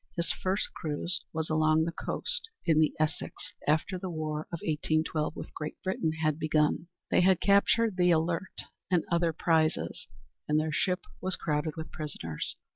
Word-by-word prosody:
His 170 0 0
first 190 +2 -1
cruise 165 +3 -2
was 160 -1 -2
along 155 0 +4
the 170 - -1
coast, 465 - -2 0.2
in 160 -2 +4
the 155 -1 +4
Essex, 155 -1 -2
after 160 +5 +1
the 185 - -4
war 155 -2 -3
of 170 - -3
1812 155 0 0
with - - -8
Great 155 0 -5
Britain 175 -4 0
had 155 0 +2
begun. 155 +1 +2 0.2
They - - +5
had 185 -1 +5
captured 200 +1 +4
the 180 -1 +4
Alert 170 +2 0 0.3
and 180 -3 +3
other 170 -1 +3
prizes, 160 -1 +1 0.4
and 150 0 +3
their 155 0 -1
ship 180 +4 +1 0.2
was 185 0 0
crowded 150 0 -1
with 160 0 -6
prisoners. 85 - -4
160 Hz, 165 wpm, -30 LUFS, 155-180 Hz, 0.4 s, They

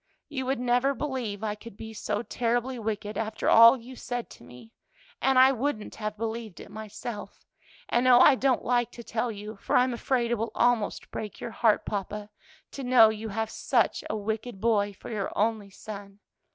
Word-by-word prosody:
You 265 -3 -4
would 265 -1 0
never 250 +3 +2
believe 240 -7 -4
I 210 -1 -1
could 210 0 -12
be 220 0 -8
so 210 +1 -3
terribly 240 +2 -1
wicked 210 -1 -3
after 220 -1 -3
all 230 +3 +8
you 250 +2 -11
said 245 -1 -5
to - - -14
me, 125 - -14 0.5
and 265 -1 +3
I 260 +1 +8
wouldn't 255 -4 -2
have 215 -1 -5
believed 225 -3 -5
it - - -11
myself, 215 0 -8 0.4
and 245 +2 +2
oh, 250 -1 +8
I 275 +3 +8
don't 260 -1 +1
like 240 0 +2
to 235 - -9
tell 230 +1 -2
you, 210 0 -8
for - - -2
I'm 250 0 +4
afraid 240 0 0
it 240 - 0
will 225 0 -2
almost 240 -3 +1
break 210 -2 -6
your 235 - -5
heart, 220 -2 +2
papa, 205 +1 -4 0.4
to 275 - -7
know 245 -3 +7
you 220 0 -5
have 220 +2 -2
such 240 -4 +1
a 215 - -1
wicked 220 +1 -4
boy 205 -2 +2
for 195 - -10
your 205 -3 -2
only 215 -1 0
son! 200 0 -9
225 Hz, 190 wpm, -27 LUFS, 210-245 Hz, 0.5 s, all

